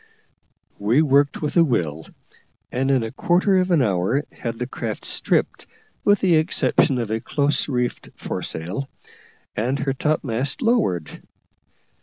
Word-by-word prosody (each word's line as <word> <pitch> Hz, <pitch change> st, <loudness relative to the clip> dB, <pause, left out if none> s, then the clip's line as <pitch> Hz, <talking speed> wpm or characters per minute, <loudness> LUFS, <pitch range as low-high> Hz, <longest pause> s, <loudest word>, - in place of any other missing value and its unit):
We 115 Hz, +9 st, +3 dB
worked 140 Hz, 0 st, +2 dB
with 150 Hz, -, -1 dB
a 170 Hz, -, +7 dB
will, 80 Hz, -, -1 dB, 0.6 s
and 130 Hz, +2 st, 0 dB
in 130 Hz, -4 st, +3 dB
a 110 Hz, -, -4 dB
quarter 185 Hz, +6 st, +2 dB
of 185 Hz, 0 st, 0 dB
an 165 Hz, -7 st, +4 dB
hour 105 Hz, +7 st, 0 dB
had 115 Hz, -2 st, -5 dB
the 125 Hz, -, -3 dB
craft 115 Hz, -3 st, -5 dB
stripped, -, -, 0 dB, 0.4 s
with 205 Hz, 0 st, +3 dB
the 180 Hz, -4 st, +4 dB
exception 155 Hz, -4 st, +2 dB
of 115 Hz, -3 st, -3 dB
a 110 Hz, -, 0 dB
close 145 Hz, +5 st, 0 dB
reefed 125 Hz, -2 st, -2 dB
foresail, 95 Hz, +12 st, -4 dB, 0.7 s
and 125 Hz, +6 st, 0 dB
her 135 Hz, -1 st, -1 dB
topmast 140 Hz, -, -1 dB
lowered. 220 Hz, -, 0 dB
135 Hz, 140 wpm, -22 LUFS, 115-155 Hz, 0.7 s, a